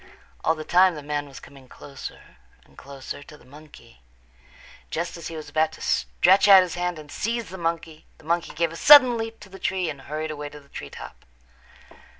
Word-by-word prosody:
All 160 - +2
the 155 - -7
time 180 +2 +4
the 150 - -8
man 145 0 -3
was 135 - -11
coming 135 -2 -16
closer 140 - -11 0.3
and 70 - -24
closer 140 - -9
to 150 +1 -14
the - - -21
monkey. 145 - -16 0.9
Just 170 +1 -4
as 170 -2 -7
he 165 - -8
was 155 -2 -8
about 155 +2 0
to - - -13
stretch 190 +3 +3
out 195 -2 +9
his 180 - -5
hand 180 -1 -2
and 150 -2 -12
seize 230 +1 -3
the 190 - -8
monkey, 165 -2 -4
the - - -20
monkey 170 +1 -1
gave 165 0 0
a - - -9
sudden 255 - +8
leap 225 0 -5
to 205 - -13
the 195 0 -12
tree 185 -4 -1
and 140 -2 -11
hurried 155 +2 -5
away 150 -1 -6
to 150 - -12
the 140 -1 -23
tree 70 - -8
top. - - -11
160 Hz, 210 wpm, -24 LUFS, 145-180 Hz, 0.9 s, out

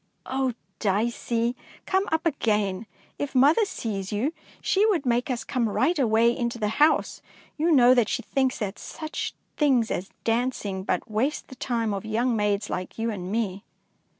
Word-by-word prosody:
Oh, 265 -1 0 0.3
Dicey, 230 +3 0 0.3
come 385 +1 +1
up 320 +1 0
again! 210 - 0 0.3
If 285 -1 -3
mother 295 - +5
sees 200 - -4
you, 240 +10 0 0.3
she 390 - +2
would 355 -10 +1
make 245 +1 +1
us 245 -2 -2
come 235 -3 0
right 265 - +1
away 235 -1 +4
into 235 -1 -2
the 210 -2 0
house; 305 +1 +3 0.3
you 325 +3 +1
know 250 -4 +7
that 240 -4 +3
she - - -1
thinks 265 -1 0
that 205 -3 -4
such 310 -1 -5 0.2
things 260 -7 +3
as 185 +3 -3
dancing 225 -5 -1
but 185 -2 -1
waste 255 +8 -1
the 260 - -10
time 230 -4 -1
of 195 - -3
young 230 +3 0
maids 210 -1 0
like 185 - -5
you 225 0 -1
and 185 -3 -5
me." 205 -3 -1
235 Hz, 170 wpm, -26 LUFS, 210-265 Hz, 0.3 s, know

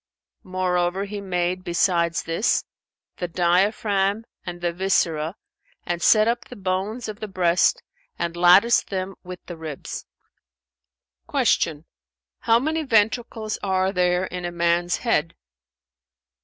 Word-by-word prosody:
Moreover, 185 0 -1
He 205 0 -6
made, 180 -1 -1
besides 170 -1 +1
this, 165 +8 0 0.5
the 175 - -3
diaphragm 195 +4 +1 0.2
and 175 -1 -6
the 175 -1 -1
viscera 170 -3 0 0.5
and 175 0 -2
set 215 +3 +5
up 235 +1 0
the 250 - -11
bones 195 +4 -2
of 215 -1 -7
the 215 - -5
breast 180 -2 +2 0.3
and 170 0 -3
latticed 180 +7 +5
them 190 0 -3
with 180 -1 -9
the 175 - -8
ribs." 155 -3 -7 1.2
Q 155 -1 +1 0.5
"How 230 0 +4
many 315 +6 -1
ventricles 225 -3 0
are 190 -1 +1
there 180 -1 +1
in 180 -1 -6
a 175 - -3
man's 170 +1 +1
head?" 165 -8 +1
185 Hz, 125 wpm, -23 LUFS, 175-205 Hz, 1.2 s, set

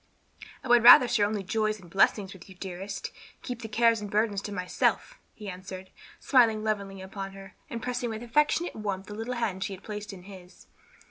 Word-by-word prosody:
"I - - -7
would 240 -1 +6
rather 245 +1 +10
share 210 -4 +2
only 210 -1 -3
joys 215 +2 -1
and 180 - -15
blessings 195 +2 +2
with 190 0 -14
you, 190 - -12
dearest, 190 +1 -6
and - - -21
keep 245 -2 -5
the 225 - -5
cares 230 0 +3
and 205 - -6
burdens 205 -1 0
to 205 - -7
myself," 200 - -1 0.2
he 210 - -10
answered, 185 0 -8 0.3
smiling 225 -5 +3
lovingly 200 -3 -3
upon 195 0 -7
her, 195 -1 -12 0.2
and 230 0 -6
pressing 245 -1 -2
with 220 +1 -5
affectionate 300 +7 +1
warmth 200 -3 -4
the 210 - -9
little 225 +4 -4
hand 205 -6 -2
she 195 - -4
had 190 - -11
placed 210 -1 -6
in 185 -2 -11
his. 185 -2 -14
210 Hz, 205 wpm, -28 LUFS, 195-230 Hz, 0.3 s, rather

